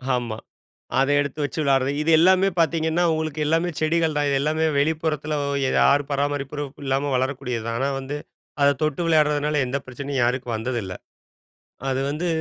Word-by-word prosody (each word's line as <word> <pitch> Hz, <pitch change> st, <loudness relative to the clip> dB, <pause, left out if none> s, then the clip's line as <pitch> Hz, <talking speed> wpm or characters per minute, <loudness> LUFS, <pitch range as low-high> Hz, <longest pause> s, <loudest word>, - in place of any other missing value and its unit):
ஆமா. 115 Hz, -3 st, -3 dB, 0.6 s
அத 135 Hz, -, +3 dB
எடுத்து 145 Hz, +2 st, -5 dB
வச்சு 145 Hz, -, -3 dB
விளையாட்றது. 135 Hz, -1 st, +2 dB
இது 165 Hz, +2 st, +1 dB
எல்லாமே 190 Hz, +2 st, +5 dB
பார்த்தீங்கன்னா 165 Hz, +1 st, +1 dB
உங்களுக்கு 155 Hz, -1 st, -3 dB
எல்லாமே 165 Hz, +3 st, +1 dB
செடிகள் 160 Hz, 0 st, +1 dB
தான் 145 Hz, 0 st, +1 dB
இது. 140 Hz, -, +1 dB
எல்லாமே 155 Hz, +2 st, +1 dB
வெளிப்புறத்துல 155 Hz, 0 st, -1 dB, 0.5 s
யார் 145 Hz, +1 st, +4 dB
பராமரிப்பும் 145 Hz, 0 st, -3 dB
இல்லாம 135 Hz, +2 st, 0 dB
வளரக்கூடியது 125 Hz, -3 st, -2 dB
தான். 115 Hz, 0 st, -2 dB
ஆனா 135 Hz, +1 st, +1 dB
வந்து 140 Hz, +2 st, -5 dB, 0.4 s
அத 140 Hz, 0 st, +5 dB
தொட்டு 155 Hz, +2 st, 0 dB
வெளையாட்றதுனால, 150 Hz, -2 st, +2 dB
எந்த 135 Hz, +3 st, -1 dB
பிரச்சனையும் 135 Hz, +1 st, -3 dB
யாருக்கும் 120 Hz, -1 st, -1 dB
வந்ததில்ல. 110 Hz, -5 st, -3 dB, 1.0 s
அது 130 Hz, 0 st, 0 dB
வந்து 160 Hz, +5 st, -3 dB
145 Hz, 150 wpm, -23 LUFS, 135-155 Hz, 1.0 s, எல்லாமே